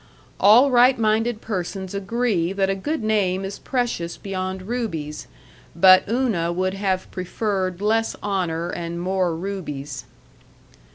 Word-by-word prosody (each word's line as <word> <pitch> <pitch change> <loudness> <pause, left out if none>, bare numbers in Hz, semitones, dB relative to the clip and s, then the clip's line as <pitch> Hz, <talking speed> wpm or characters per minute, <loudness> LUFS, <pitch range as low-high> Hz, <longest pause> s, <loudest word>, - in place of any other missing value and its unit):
All 240 +7 +6
right 250 +1 +5
minded 220 +1 +1
persons 190 -2 -4
agree 200 -3 0
that 195 -1 +1
a - - -1
good 290 +8 -3
name 195 -3 +1
is 195 +1 -6
precious 240 -10 -2
beyond 185 -1 -4
rubies, 185 -10 -4 0.5
but 185 +2 +6
Una 220 -9 0
would 185 +2 -1
have 195 -2 -2
preferred 185 0 -2
less 225 +1 +1
honor 175 -5 -1
and 170 0 -5
more 180 -1 0
rubies. 150 -8 -5
195 Hz, 125 wpm, -22 LUFS, 180-220 Hz, 0.5 s, All